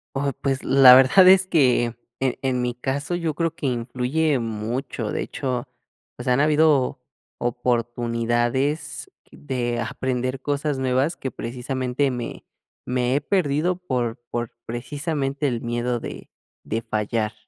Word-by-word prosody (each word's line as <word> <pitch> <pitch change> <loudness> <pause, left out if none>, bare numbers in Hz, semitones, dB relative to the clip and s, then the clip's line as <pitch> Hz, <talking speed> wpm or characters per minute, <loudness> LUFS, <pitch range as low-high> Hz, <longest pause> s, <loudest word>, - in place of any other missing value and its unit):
Oh, 140 0 0
pues 135 -1 -1
la 130 -1 +8
verdad 135 +9 +7
es 190 0 +7
que 130 -9 +3 0.3
en 130 -2 0
en 130 -2 0
mi 125 -1 -2
caso 140 +6 -2
yo 165 -3 -1
creo 165 +1 -1
que 150 - -6
influye 130 +5 0
mucho, 115 +1 -3
de - - -2
hecho, 130 -2 -3 0.5
pues 125 - -8
han 125 +1 +3
habido 150 -3 +3 0.4
oportunidades 120 +3 -1 0.2
de 120 - -3
aprender 130 +1 -2
cosas 145 +1 -1
nuevas 130 +5 +1
que 130 - -4
precisamente 130 +3 -2
me 120 -2 -6 0.4
me 125 0 0
he 145 - +1
perdido 165 0 +1
por 125 -9 -2
por 120 -1 -3 0.2
precisamente 140 +4 -2
el 120 -3 -2
miedo 120 +1 -1
de - - -8 0.3
de 115 +1 -3
fallar. 105 +1 -1
130 Hz, 135 wpm, -23 LUFS, 120-145 Hz, 0.5 s, la